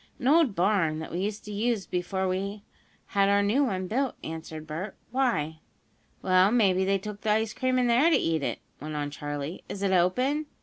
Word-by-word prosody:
"An 255 - -3
old 295 -7 +4
barn, 175 -4 +2
that 160 - -6
we 175 - -3
used 205 +2 -3
to 210 - -7
use 215 0 0
before 185 +1 -2
we 200 +3 -3 0.5
had 200 0 +3
our 200 0 +4
new 230 +8 +3
one 190 -6 -2
built," 255 +7 -1
answered 160 -1 -7
Bert. 165 +6 -5 0.2
"Why?" 160 - 0 0.6
"Well, 185 +1 +5
maybe 195 -6 +3
they 195 +1 +2
took 205 +1 -7
the 220 - -2
ice 220 +1 +1
cream 255 0 0
in 250 - +3
there 245 +7 +4
to 335 - +5
eat 160 -2 0
it," - - -2 0.2
went 155 +1 -6
on 145 -1 -2
Charley. 145 +2 -5
"Is 200 - -5
it 195 - +2
open?" 250 - +2
195 Hz, 205 wpm, -27 LUFS, 175-225 Hz, 0.6 s, Well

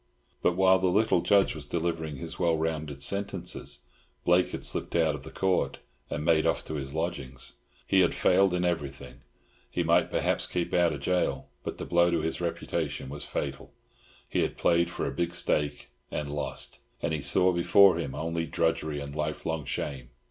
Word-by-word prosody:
But 90 - +2
while 95 0 +5
the 95 - +2
little 100 0 +3
Judge 100 +1 +4
was - - -9
delivering 80 -3 -2
his 80 +5 -7
well 85 -2 +2
rounded 80 -3 -3
sentences, 100 +5 -1 0.4
Blake 90 +1 +4
had - - -4
slipped - - -1
out 80 -2 +3
of 70 -2 -8
Court 95 -1 +1 0.3
and 75 +1 -3
made 80 -1 +4
off - - 0
to - - -6
his 70 -1 -4
lodgings. 80 -6 -3 0.3
He 95 - +3
had 90 -2 +3
failed 95 0 +4
in 90 0 0
everything. 70 -7 -3 0.5
He - - -1
might - - +3
perhaps - - 0
keep 85 - -2
out 85 -2 +4
of 70 -1 -5
gaol; 90 -1 0
but - - -5
the - - -5
blow 85 0 +4
to 85 -2 +1
his 80 +2 -2
reputation 85 -5 -3
was 70 +1 -5
fatal. 70 -1 -4 0.5
He - - -1
had - - -1
played 85 0 +3
for - - -3
a - - -1
big 85 +4 -2
stake 75 -4 -1 0.2
and 75 -1 -4
lost, 75 - -3 0.2
and - - 0
he 75 - -1
saw 90 +7 +4
before 90 +1 +6
him 70 -5 -4
only 80 +2 -2
drudgery 80 -3 0
and 70 0 -7
lifelong 75 0 -2
shame. 65 -4 -4
80 Hz, 185 wpm, -28 LUFS, 75-90 Hz, 0.5 s, before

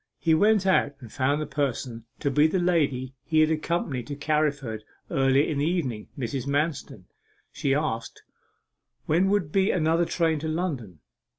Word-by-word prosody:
He 165 - +2
went 205 +4 +4
out 185 -6 +2
and 120 -5 -12
found 140 +2 +1
the 155 - -2
person 125 -6 -3 0.2
to 140 - 0
be 150 +3 +4
the 175 - 0
lady 145 -8 +1
he 155 -1 +2
had 155 0 +3
accompanied 155 -5 -2
to 145 - -5
Carriford 145 -6 -1 0.3
earlier 135 +2 +3
in 145 -3 -2
the 145 - +1
evening, 130 -12 -2
Mrs. 135 +1 -3
Manston. 145 - -2 0.5
She 135 -1 0
asked, 140 -7 -3 0.8
when 175 +5 +2
would 195 -7 0
be 195 +3 +2
another 165 0 +2
train 165 -2 0
to 160 - -4
London? 140 - -3
150 Hz, 165 wpm, -26 LUFS, 135-165 Hz, 0.8 s, went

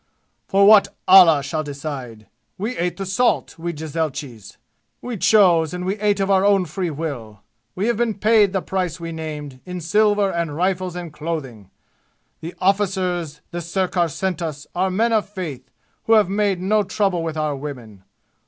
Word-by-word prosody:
"For 200 0 +4
what 210 0 +7 0.2
Allah 170 -6 +7
shall 155 +2 -2
decide! 140 -6 -7 0.3
We 220 +6 -3
ate 175 +1 -2
the 195 - -4
salt, 195 -2 0
we 170 +1 -3
jezailchis. 150 -7 -5 0.4
We 245 -1 -5
chose, 180 -6 +4
and 180 0 -5
we 195 +3 -2
ate 205 -1 +1
of 195 0 0
our 190 -1 +4
own 200 -2 +3
free 175 +2 -3
will. 135 -10 -6 0.3
We 190 - -1
have 235 -2 +1
been 235 -2 0
paid 210 -1 +3
the 190 -1 -2
price 180 -3 -2
we 165 0 -6
named, 150 -4 -7
in 180 -1 -6
silver 205 +3 +2
and 170 -3 -3
rifles 185 +1 -1
and 175 -3 -7
clothing. 140 - -6 0.7
The 165 +2 -8
arrficers 185 -5 0
the 175 0 -4
sirkar 175 0 0
sent 185 +3 -3
us 150 -3 -5
are 185 +2 0
men 225 +5 +1
of 215 -2 +1
faith 160 -11 -7 0.4
who 225 - +3
have 210 -4 +5
made 200 -2 0
no 210 +4 +2
trouble 195 -3 0
with 160 -1 -4
our 155 -2 -1
women. 125 -9 -9
175 Hz, 170 wpm, -21 LUFS, 155-195 Hz, 0.7 s, what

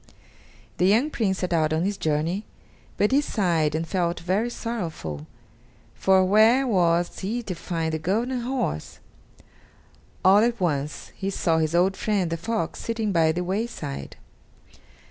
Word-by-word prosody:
The 180 - +4
young 235 +10 +3
Prince 195 -8 0
set 180 -2 -2
out 155 -2 +2
on 160 +2 +1
his 205 +1 -1
journey, 160 +5 -1 0.5
but 205 - +2
he 280 +2 +4
sighed 170 - 0
and 165 +1 -2
felt 175 0 -1
very 195 +7 0
sorrowful, 165 - -5 0.7
for 190 -1 +3
where 220 +7 +5
was 175 -6 +1
he 225 +5 -3
to 195 - -4
find 165 -2 -3
the 160 - -1
golden 230 +10 -1
horse? 245 - -3 1.3
All 195 +2 +7
at 235 +1 +1
once, 150 -4 -2
he 195 - -3
saw 165 -4 +1
his 160 +1 0
old 185 +3 +3
friend, 195 -6 0
the 165 - -1
fox, 195 -1 -3
sitting 225 -2 -2
by 165 -3 +3
the 180 +3 -2
wayside. 180 - -4
185 Hz, 150 wpm, -25 LUFS, 165-220 Hz, 1.3 s, All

